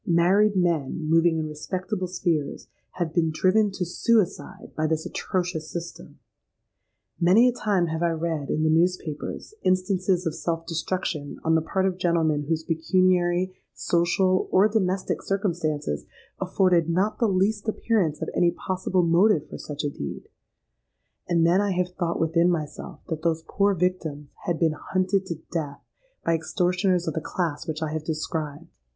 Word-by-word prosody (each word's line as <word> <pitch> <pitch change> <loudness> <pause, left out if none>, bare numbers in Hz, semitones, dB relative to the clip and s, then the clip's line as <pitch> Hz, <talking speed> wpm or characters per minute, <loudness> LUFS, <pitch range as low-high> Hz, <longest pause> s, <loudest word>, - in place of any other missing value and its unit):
Married 190 +5 +4
men, 165 -3 0
moving 165 +1 +4
in 155 -1 -2
respectable 185 +5 -4
spheres, 170 -5 -2 0.3
have 170 -3 -3
been 165 -1 +2
driven 190 +7 +3
to 190 -2 -3
suicide 200 +2 0
by 155 0 0
this 160 0 -1
atrocious 175 -4 -3
system! 170 0 -7 1.0
Many 190 +8 +6
a - - +4
time 205 -7 +1
have 160 0 -3
I 170 - +3
read, 160 -3 -2
in 155 - 0
the 160 - +3
newspapers, 165 - -1
instances 185 0 +1
of 165 - -1
self 165 0 -3
destruction 165 -3 -3
on 160 - +2
the 160 - +4
part 190 +4 -1
of 185 -1 -1
gentlemen 160 -4 +1
whose 160 +1 -1
pecuniary, 180 +2 +2 0.2
social, 185 +2 +2
or 195 +3 +5
domestic 195 -3 0
circumstances 165 - -1 0.4
afforded 175 -4 +2
not 190 +5 0
the 230 - +3
least 200 +3 +1
appearance 200 -9 0
of - - -3
any 175 - +3
possible 185 +1 -1
motive 170 0 +3
for - - -8
such 145 -1 -5
a 145 - 0
deed;—and 70 - -6
then 175 +4 +4
I 205 -2 0
have 180 0 0
thought 175 -2 -2
within 165 +2 +3
myself 155 -3 -4
that 160 -2 -3
those 160 -1 0
poor 200 0 +2
victims 165 -5 -2 0.2
had 170 -2 0
been 160 -2 +2
hunted 185 +4 -1
to 165 -3 -5
death 150 -4 -3 0.5
by 165 - +3
extortioners 180 +2 +1
of 160 - -1
the 160 - -2
class 165 -1 -3
which 160 0 -3
I 155 - -2
have 155 -1 -3
described! 155 -2 -4
170 Hz, 160 wpm, -25 LUFS, 160-185 Hz, 1.0 s, Many